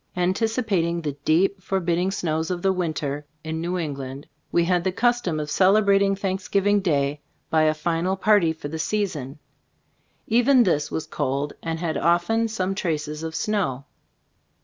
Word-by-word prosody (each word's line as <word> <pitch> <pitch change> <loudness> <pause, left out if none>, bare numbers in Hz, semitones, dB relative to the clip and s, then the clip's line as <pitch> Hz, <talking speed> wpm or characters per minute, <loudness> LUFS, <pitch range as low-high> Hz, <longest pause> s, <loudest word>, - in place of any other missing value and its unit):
An 180 +1 +1
ticipating 200 -7 0
the 150 - -1
deep, 190 +5 +2
forbidding 180 -1 0
snows 160 -4 -2
of 180 -1 -3
the 190 -1 +3
winter 155 -5 -2 0.2
in 160 0 -4
New 175 +2 -2
England, 140 -4 -5 0.3
we 170 - +3
had 175 0 +1
the 190 - +1
custom 240 -6 +1
of 150 0 -4
celebrating 195 +1 +4
Thanksgiving 195 +1 +1
day 145 -5 0 0.3
by 155 -1 +4
a 155 0 +2
final 170 +4 0
party 200 -4 +4
for 160 -2 -7
the 160 +2 -5
season. 155 -8 -2 0.9
Even 245 +3 +4
this 150 -7 +1
was 160 - -3
cold 140 +2 -2
and 165 -1 -3
had 160 -3 -2
often 175 +8 +2
some 195 -4 -2
traces 155 -5 -3
of 160 0 -5
snow. 185 - -1
175 Hz, 155 wpm, -24 LUFS, 155-195 Hz, 0.9 s, celebrating